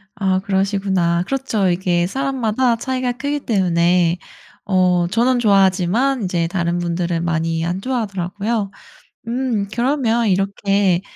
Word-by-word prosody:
아 190 -2 +1
그러시구나. 190 -3 0
그렇죠. 230 -6 0
이게 175 -1 +1
사람마다 255 -1 0
차이가 255 +1 -2
크기 285 +3 -3
때문에 175 -6 +2 0.5
어 180 -3 +2
저는 245 +6 +2
좋아하지만 200 +4 +2
이제 175 -2 0
다른 170 -1 -1
분들은 170 -1 -2
많이 165 -1 -1
안 175 +2 -2
좋아하더라고요. 205 -2 -2 0.6
음 235 -4 -1
그러면 240 -3 +1
이렇게 195 -1 +1
195 Hz, 295 characters per minute, -19 LUFS, 175-235 Hz, 0.6 s, 때문에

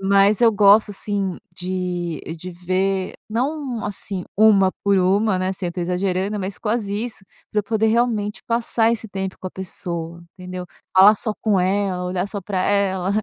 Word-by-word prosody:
Mas 200 +1 +4
eu 230 -2 +6
gosto, 205 +1 +5
assim, 200 -2 -2 0.2
de 180 -2 -3 0.2
de 180 +3 -8
ver 185 +2 -1
não, 255 +1 -2
assim, 195 -2 -5
1 200 -3 +5
por 200 -1 +4
1, 195 +2 +2
né, 185 0 -1
assim, 190 -1 -3
eu 175 - -3
tô 180 - -4
exagerando, 185 +3 -1
mas 190 0 -4
quase 210 -2 -1
isso, 220 -5 -7 0.3
pra 210 - +1
eu - - -10
poder 220 +1 0
realmente 220 -2 0
passar 230 -1 +2
esse 225 -1 -4
tempo 190 -1 -4
com 185 - -5
a - - -5
pessoa, 170 -2 -5 0.2
entendeu. 180 0 -6 0.3
Falar 200 +3 +9
só 215 +1 -2
com 210 -4 +2
ela, 185 0 0
olhar 180 +1 -2
só 200 0 -5
para 190 0 -2
ela, 195 -2 +1
195 Hz, 175 wpm, -21 LUFS, 185-210 Hz, 0.3 s, Falar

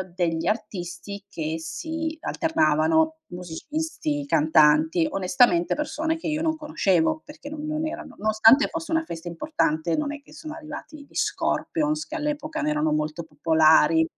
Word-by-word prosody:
degli 165 -2 0
artisti 200 -2 -4
che 160 -2 -3
si 320 - -4
alternavano: 315 - +2 0.2
musicisti, 290 - -4
cantanti, 155 - +4
onestamente, 185 -2 +2
persone 315 +2 -2
che, 320 - -6
io, 305 0 -1
non 320 -1 +1
conoscevo, 300 - +1
perché 295 -1 -11
non 305 0 -6
non 310 +1 -2
erano 330 +2 -7
nonostante 220 +6 +5
fosse 330 0 -6
una 325 0 +2
festa 165 - -7
importante, 170 - -1
non 295 -1 -1
è 295 - -8
che - - -18
sono 310 -1 -8
arrivati 305 -1 -9
gli - - -25
Scorpions, 305 -1 -1
che 315 - -7
all'epoca, 305 +1 -3
no, 300 - 0
erano 300 +1 +1
molto 155 +2 -1
popolari 160 +1 +4
280 Hz, 150 wpm, -25 LUFS, -, 0.2 s, nonostante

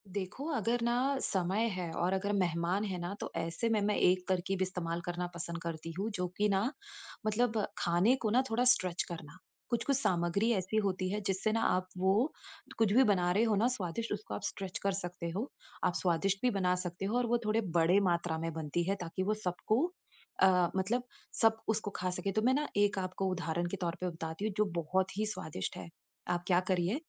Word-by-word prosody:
देखो, 195 +8 -4
अगर 240 -4 +1
ना 250 +4 +2
समय 190 +3 +1
है 180 -3 -3
और 175 +3 +1
अगर 195 +2 0
मेहमान 180 +1 +1
है 190 -3 -3
ना, 175 +2 -3
तो - - -5
ऐसे 165 +7 -1
में 220 -1 +3
मैं 205 +1 +2
एक 180 0 +3
तरक़ीब 190 0 0
इस्तेमाल 175 -2 -2
करना 175 0 -2
पसंद 170 0 -5
करती 165 0 -5
हूँ, 210 +3 0
जो 180 -3 -1
कि 210 - +3
ना 200 +6 +2 0.5
मतलब 225 +1 +2 0.2
खाने 175 +8 +3
को 220 - +1
ना 245 +4 +4
थोड़ा 230 +2 +2
स्ट्रेच 180 -6 0
करना। 160 -2 -8 0.3
कुछ-कुछ 255 +3 +1
सामग्री 190 -1 +1
ऐसी 195 +1 -1
होती 185 -1 0
है 210 - -1
जिससे 195 +3 +1
ना 225 +1 +1
आप 185 0 +2
वो 195 +10 +3 0.5
कुछ 220 -3 +3
भी 260 +4 +7
बना 185 -6 +3
रहे 205 +5 +3
हो 220 -2 +3
ना 215 +4 +3
स्वादिष्ट, 230 -2 -3
उसको 210 +1 -5
आप - - -5
स्ट्रेच 195 -2 -4
कर 200 - +2
सकते 180 -2 -4
हो। 225 +8 -2 0.3
आप - - +3
स्वादिष्ट 185 +2 +1
भी 250 - +3
बना 185 -3 +2
सकते 180 +2 -4
हो, 215 +5 +1
और 245 - +2
वो 240 +1 +3
थोड़े 215 +2 +2 0.2
बड़े 170 +4 +5
मात्रा 170 -1 0
में 165 +1 -2
बनती 160 +2 -1
है 195 - +2
ताकि 175 +2 -3
वो 210 +3 +1
सबको 185 +6 +1 0.6
अ, 180 -2 +5
मतलब 215 +7 +1 0.4
सब 225 -1 +5
उसको 215 -1 0
खा 185 - -1
सकें। 180 +2 -2
तो 215 - +2
मैं 250 +4 +4
ना 295 +2 +1
एक 205 0 +3
आपको 185 +1 -2
उदाहरण 175 -1 -1
के 195 - -3
तौर 170 -1 -1
पे 180 - 0
बताती 165 +3 -5
हूँ, 215 - -1
जो 210 - +4
बहुत 185 +3 0
ही 215 - +1
स्वादिष्ट 155 - -4
है। - - -7 0.4
आप 175 0 0
क्या 180 -1 +5
करिए, 180 +3 +2
190 Hz, 210 wpm, -33 LUFS, 175-215 Hz, 0.6 s, भी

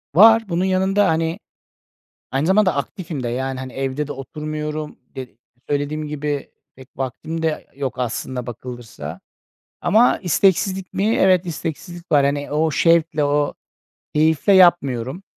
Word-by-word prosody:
Var 225 +4 +8
bunun 175 +2 0
yanında, 190 +2 +2
hani, 165 +2 0 0.9
aynı 135 +3 0
zamanda 190 0 +3
aktifim 155 0 -4
de, 120 - -2
yani, 130 +2 -3
hani, 130 -1 -7
evde 135 +2 -2
de 145 - -5
oturmuyorum 150 +2 -5 0.2
de 130 -1 -5 0.4
söylediğim 145 +2 -2
gibi, 145 -1 -3 0.3
pek 130 0 -14
vaktim 145 +5 -4
de 160 -1 -2
yok 135 -2 -4
aslına 125 0 -3
bakılırsa 120 - -8 0.6
ama 230 +4 +4
isteksizlik 190 +1 +1
mi? 215 +4 +1
Evet, 185 -1 +3
isteksizlik 170 +1 -6
var. 145 -2 +5
Hani, 145 +1 -1
o 155 +2 +1
şevkle, 160 -1 +3
o 145 0 +1 0.6
keyifle 160 +5 +3
yapmıyorum. 170 -5 +3
150 Hz, 135 wpm, -21 LUFS, 135-175 Hz, 0.9 s, Var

